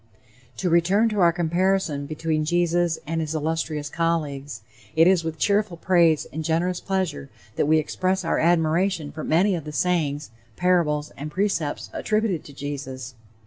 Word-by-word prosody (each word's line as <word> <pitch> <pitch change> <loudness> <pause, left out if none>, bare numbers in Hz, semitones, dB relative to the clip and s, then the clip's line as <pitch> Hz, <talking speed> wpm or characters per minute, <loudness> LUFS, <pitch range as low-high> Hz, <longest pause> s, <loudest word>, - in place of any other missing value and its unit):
To 180 - -1
return 180 +6 +3
to 210 -2 -2
our 170 -2 +6
comparison 170 -3 0
between 155 0 -1
Jesus 175 +1 +1
and 165 +1 -2
his 160 0 -3
illustrious 155 -1 -2
colleagues. 145 -6 -2 0.3
It 165 +1 +6
is 180 -2 +4
with 160 -1 -4
cheerful 200 -1 +1
praise 170 -3 +3
and 160 +1 -3
generous 170 +3 0
pleasure 185 -8 -2 0.3
that - - +1
we 155 +1 +5
express 185 +4 -1
our - - +1
admiration 165 0 +1
for 155 0 -7
many 185 +6 +3
of 170 -4 -3
the 150 - -7
sayings, 150 -5 -1 0.2
parables, 165 -5 +1
and 150 +2 -5
precepts 175 -4 -2
attributed 215 -6 0
to 145 - -12
Jesus. 135 -3 -6
165 Hz, 155 wpm, -24 LUFS, 150-180 Hz, 0.3 s, our